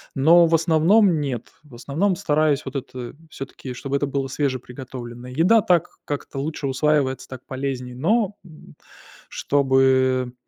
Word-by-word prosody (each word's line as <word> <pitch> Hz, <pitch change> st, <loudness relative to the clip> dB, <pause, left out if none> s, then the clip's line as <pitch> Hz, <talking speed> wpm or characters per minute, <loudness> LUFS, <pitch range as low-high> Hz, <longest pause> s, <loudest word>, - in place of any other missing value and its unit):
Но 165 Hz, +5 st, +6 dB
в 165 Hz, -, 0 dB
основном 165 Hz, +3 st, +4 dB
нет, 130 Hz, -5 st, -4 dB
в 145 Hz, -5 st, -19 dB
основном 165 Hz, +10 st, -1 dB
стараюсь 155 Hz, -5 st, +1 dB
вот 135 Hz, -, -7 dB
это 130 Hz, -2 st, -6 dB
всё-таки, 135 Hz, -2 st, -8 dB
чтобы 135 Hz, +2 st, -4 dB
это 145 Hz, -, -1 dB
было 135 Hz, -1 st, -2 dB
свежеприготовленное. 125 Hz, -2 st, -5 dB
Еда 185 Hz, -, +4 dB
так 175 Hz, -4 st, +2 dB, 0.2 s
как-то 145 Hz, -1 st, -5 dB
лучше 145 Hz, 0 st, -3 dB
усваивается, 135 Hz, 0 st, 0 dB
так 130 Hz, -1 st, -10 dB
полезнее, 130 Hz, -2 st, -4 dB
но, 205 Hz, -, +1 dB
м, 160 Hz, -3 st, -15 dB, 0.5 s
чтобы 130 Hz, -2 st, +2 dB
140 Hz, 135 wpm, -22 LUFS, 130-160 Hz, 0.5 s, Но